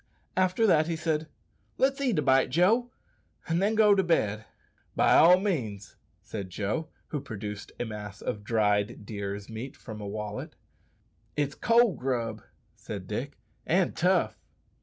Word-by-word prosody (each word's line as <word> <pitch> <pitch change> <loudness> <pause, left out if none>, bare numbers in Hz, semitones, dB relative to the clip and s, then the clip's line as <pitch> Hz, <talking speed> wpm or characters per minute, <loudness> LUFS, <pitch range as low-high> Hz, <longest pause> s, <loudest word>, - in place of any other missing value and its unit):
After 185 +4 +2
that 160 -6 +4
he 165 - -1
said, 160 -1 -1 0.5
"Let's 275 +1 +2
eat 250 -7 +1
a 150 - +2
bite, 135 -1 +4
Joe, 205 - +3 0.6
and 170 +1 +1
then 210 +3 +2
go 210 -1 +6
to 195 - +4
bed." 110 - +1 0.5
"Be - - +3
all 180 +3 +7
means," 120 - -3 0.3
said 100 -4 -6
Joe, 110 - -2 0.2
who 150 - -3
produced 105 -2 -7
a 120 - -1
mass 105 -2 -7
of 105 - -4
dried 105 0 +1
deer's 100 -1 -5
meat 115 +4 -7
from 110 -3 -9
a 100 - -5
wallet. 105 0 -5 0.8
"It's 145 -1 0
cold 230 0 +3
grub," 125 -3 -2 0.3
said - - -7
Dick, - - -4 0.3
"and - - +2
tough." - - +2
130 Hz, 150 wpm, -28 LUFS, -, 0.8 s, all